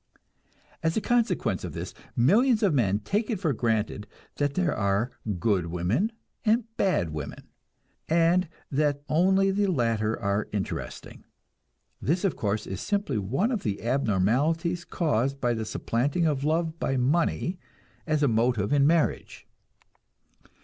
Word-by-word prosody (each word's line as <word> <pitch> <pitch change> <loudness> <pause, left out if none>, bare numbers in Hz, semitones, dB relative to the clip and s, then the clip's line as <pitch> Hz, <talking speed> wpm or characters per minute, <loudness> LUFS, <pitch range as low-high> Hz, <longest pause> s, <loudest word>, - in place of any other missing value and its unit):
As 160 +3 0
a - - +4
consequence 240 +1 0
of - - -5
this, - - -6 0.2
millions 215 - +4
of 195 -6 +3
men 105 -8 +2
take 210 - -1
it 215 -5 -1
for 160 -7 +1
granted 110 -3 -1 0.3
that 145 -1 0
there 180 -5 +1
are 100 +4 0 0.3
"good" 95 -4 +1
women 90 - 0 0.3
and 230 +2 +3
"bad" 180 - +1
women, 75 -2 -6 0.7
and 170 +2 +3 0.2
that 145 0 +1
only 190 +4 +3
the 200 +1 +1
latter 115 - 0
are 100 +1 -1
interesting. 100 -2 -5 0.8
This, 175 +6 0
of 195 - +1
course, 105 0 -1
is 95 +1 -5
simply 200 - -1
one 135 - 0
of 225 -6 -1
the 100 -1 -3
abnormalities 140 - +1
caused 135 -4 0
by 120 -3 +1
the 110 -1 -3
supplanting 130 +9 0
of 145 -4 0
love 160 +2 0
by 135 - 0
money 170 +6 +1 0.5
as 155 -1 +1
a - - +5
motive 115 -1 +1
in 140 -1 +4
marriage. 165 0 0
145 Hz, 145 wpm, -27 LUFS, 110-175 Hz, 0.8 s, a